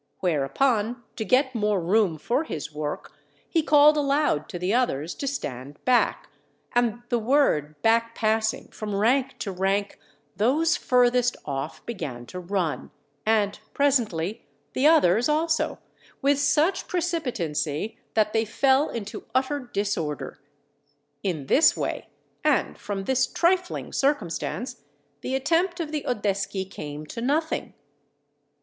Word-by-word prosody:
Whereupon, 210 - +1
to 220 - -3
get 260 +5 +2
more 210 -3 +1
room 180 -1 +2
for 240 - 0
his 150 - -5
work, 150 0 -5 0.3
he 330 - +2
called 300 +1 +6
aloud 280 - +1
to - - -5
the 180 +4 -1
others 175 - 0
to 280 - -5
stand 140 - -5
back; 250 -1 +2 0.5
and 240 -1 +1
the 240 - +1
word 215 - +2
back 230 +1 +2
passing 220 0 0
from 210 -2 -5
rank 255 +6 +2
to 200 - -4
rank 195 +2 -1 0.4
those 300 +10 +2
furthest 245 -1 +2
off 140 +1 -5
began 130 - -5
to 180 - -7
run, 180 -3 -2 0.4
and, 210 -2 +2 0.2
presently, 225 - +1 0.3
the 270 +3 +3
others 245 - +4
also, 315 +1 +1 0.4
with 280 +1 +2
such 300 +5 +2
precipitancy, 225 - -2 0.2
that 215 -1 +2
they 225 - +3
fell 265 +6 +2
into 210 -3 -6
utter 270 +3 +1
disorder. 200 - -3 0.8
In 165 -8 -2
this 310 - +5
way, - - -3 0.4
and - - +2
from 200 -2 -5
this 260 +5 +2
trifling 360 +1 0
circumstance, 250 - -1 0.4
the 260 - -2
attempt 335 +6 +1
of 315 -3 -3
the 300 -2 -2
Oddeschi 195 -4 -1
came 150 -5 -7
to 230 +10 -7
nothing. 305 +6 -1
225 Hz, 130 wpm, -25 LUFS, 185-275 Hz, 0.8 s, called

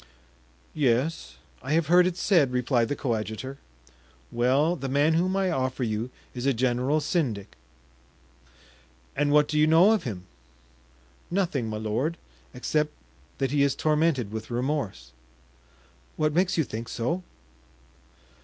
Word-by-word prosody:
"Yes, 140 +2 0 0.3
I 135 +3 -2
have 165 0 +2
heard 175 +3 +5
it 180 -1 -3
said," 165 -12 +3
replied 125 -1 +1
the 145 - -2
coadjutor. 120 +2 -3 0.7
"Well, 135 +8 +2
the 135 -5 -5
man 145 +4 +3
whom 180 +3 +1
I 190 -2 +1
offer 130 -3 -1
you 110 +1 -2 0.2
is 125 +1 -3
a 135 - +2
general 130 +4 +1
syndic." 130 - -2 1.6
"And 145 0 +1
what 150 0 +5
do 150 - 0
you 155 - +5
know 165 +6 +6
of 220 - +2
him?" 95 -8 -6 1.0
"Nothing, 170 - -1
my 110 - -3
lord, 115 +10 -2 0.3
except 150 +4 -1 0.5
that 135 -2 -1
he 145 -1 +2
is 140 -1 +2
tormented 150 -8 +1
with 110 0 -6
remorse." 120 - -3 1.1
"What 155 -1 +1
makes 180 +2 +1
you 160 - +3
think 115 -2 -6
so?" 145 +10 -2
140 Hz, 135 wpm, -26 LUFS, 120-160 Hz, 1.6 s, know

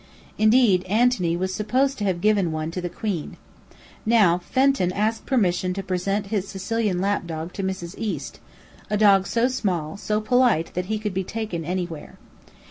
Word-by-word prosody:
Indeed, 215 -4 +4
Antony 205 -4 +2
was 185 +1 -2
supposed 255 +7 0
to - - -2
have 180 -3 -1
given 205 -5 +2
one 155 +1 -3
to 180 - -4
the 175 - -3
Queen. 180 -3 -4 0.7
Now, 210 -6 +4
Fenton 260 -2 +1
asked 220 +3 -1
permission 185 -7 +1
to 195 - -4
present 195 +2 -2
a 210 -3 +1
Sicilian 195 +1 -2
lap 195 -1 0
dog 165 +1 -5
to 200 - -4
Mrs. 190 -2 -4
East, 180 -11 -4 0.5
a 210 - +1
dog 200 -2 +5
so 235 +1 +2
small, 190 -9 -2
so 210 +1 -1
polite, 235 -6 +2
that 180 +1 -2
he 215 +3 -2
could 210 -2 -4
be 190 +1 -1
taken 210 -5 -4
anywhere. 175 -2 -5
195 Hz, 170 wpm, -23 LUFS, 180-215 Hz, 0.7 s, dog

